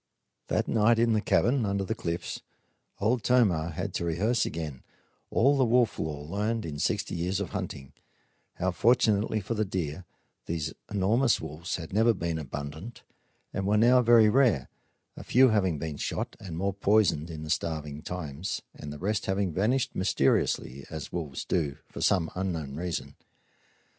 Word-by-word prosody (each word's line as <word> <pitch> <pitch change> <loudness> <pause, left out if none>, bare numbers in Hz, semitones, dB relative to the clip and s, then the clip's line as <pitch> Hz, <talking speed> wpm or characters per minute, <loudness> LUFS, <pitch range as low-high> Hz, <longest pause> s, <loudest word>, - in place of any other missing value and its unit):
That - - 0
night, 115 +1 +3
in 115 0 +3
the 110 - +2
cabin 120 +3 +2
under 100 -1 0
the 105 - -2
cliffs, 85 -6 -4 0.6
Old 115 +4 +1
Tomah 100 -10 +3
had 95 +4 -4
to - - -2
rehearse 100 +9 +1
again 75 -5 -5 0.5
all 135 +5 +4
the 135 - +3
wolf 120 -1 +2
lore 75 -2 -4
learned 105 +6 -2
in 75 -3 -5
sixty 100 +4 -1
years 90 +2 -1
of 100 - -4
hunting: 65 -1 -5 0.6
how, 95 +1 0
fortunately 110 +1 +3
for 100 +3 -3
the 110 -1 0
deer, 90 -3 -4 0.4
these 80 -2 -2 0.2
enormous 110 +6 +2
wolves 80 +2 -5
had 80 0 -7
never 115 +2 +4
been 85 -2 -2
abundant 75 - -7 0.5
and 95 -1 -2
were 105 +1 +3
now 125 +3 +6
very 115 -2 +6
rare, 115 - +3 0.5
a - - -9
few 130 +1 +5
having 95 -7 +2
been 75 0 -4
shot, - - -3
and 85 -5 -7
more 100 +2 0
poisoned 100 -5 +2
in 80 -2 -6
the 75 - -4
starving 75 -2 -2
times, 85 0 -4
and 75 - -8
the 75 - -7
rest 100 +5 -1
having 95 -2 0
vanished, 125 +8 +1
mysteriously 70 -7 +1
as 80 -2 -6
wolves 75 -6 -4
do, 75 -5 -1
for - - -9
some 85 -4 +2
unknown 85 -7 -3
reason. 85 +1 -4
95 Hz, 165 wpm, -28 LUFS, 80-110 Hz, 0.6 s, now